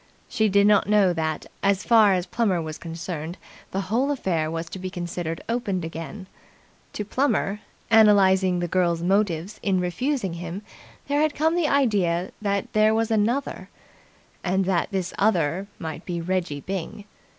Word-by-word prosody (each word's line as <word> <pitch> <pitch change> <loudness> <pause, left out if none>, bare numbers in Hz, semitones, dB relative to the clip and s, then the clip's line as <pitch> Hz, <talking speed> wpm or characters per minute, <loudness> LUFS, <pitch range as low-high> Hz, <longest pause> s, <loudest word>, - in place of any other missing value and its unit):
She 220 -1 +1
did 200 +1 +4
not 205 -1 +4
know 205 -4 +4
that, 160 -2 -2 0.2
as 200 -1 +2
far 220 -4 +5
as 180 -1 -1
Plummer 195 -2 0
was 155 -1 -5
concerned, 165 0 -6 0.3
the 195 - -2
whole 230 +9 0
affair 175 - -1
was 165 +1 -4
to 190 - -7
be 185 0 -4
considered 175 -2 -4
opened 200 -7 -1
again. 165 +5 -7 0.7
To 210 - -4
Plummer, 210 -4 0 0.3
analysing 190 -4 +5
the 175 - -1
girl's 170 -1 +1
motives 190 0 0
in 190 -2 +1
refusing 195 - -1
him, 175 +4 -6 0.4
there 285 +1 +1
had 310 -1 +1
come 320 +3 +2
the 345 -3 +2
idea 200 -11 +1
that 200 -2 -2
there 215 +1 +4
was 225 0 0
Another, 230 +6 0 0.7
and 190 +1 +1
that 180 -2 0
this 190 -3 -3
other 185 -2 +1
must 160 +1 -6
be 175 -2 -2
Reggie 170 -4 -2
Byng. 195 +3 -5
190 Hz, 160 wpm, -24 LUFS, 175-215 Hz, 0.7 s, far